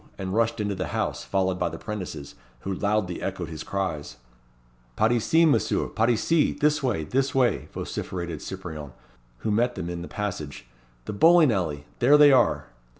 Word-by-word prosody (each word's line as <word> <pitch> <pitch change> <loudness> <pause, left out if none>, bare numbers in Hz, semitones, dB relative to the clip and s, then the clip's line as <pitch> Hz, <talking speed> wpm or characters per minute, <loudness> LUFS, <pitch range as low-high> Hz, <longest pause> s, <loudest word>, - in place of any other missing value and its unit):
and 95 -1 -4
rushed 115 +1 +1
into 105 -1 -1
the 90 -1 -3
house, - - -2
followed 95 -1 0
by 90 - 0
the - - -7
'prentices, 90 -9 -6 0.3
who 95 - -3
loudly 100 -2 -1
echoed 95 -4 -4
his 80 -2 -7
cries. 75 -10 -4 0.8
"Par 110 - +2
ici, 160 +8 +3
Messieurs! 155 - +1
Par 115 +2 +2
ici! 150 +7 +2
this 150 0 +1
way, 120 - -1
this 135 - -1
way!" 130 -2 +2
vociferated 85 -4 -5
Cyprien, 80 -7 -7 0.5
who 110 - -1
met 120 +4 +1
them 90 -2 -4
in 85 -1 -5
the 85 - -7
passage 90 -9 -5 0.4
"the - - -4
bowling 165 +5 +6
alley 80 -8 -2
there 140 +5 +6
they 145 -1 +8
are!" 130 -3 +3
100 Hz, 170 wpm, -25 LUFS, 85-120 Hz, 0.8 s, they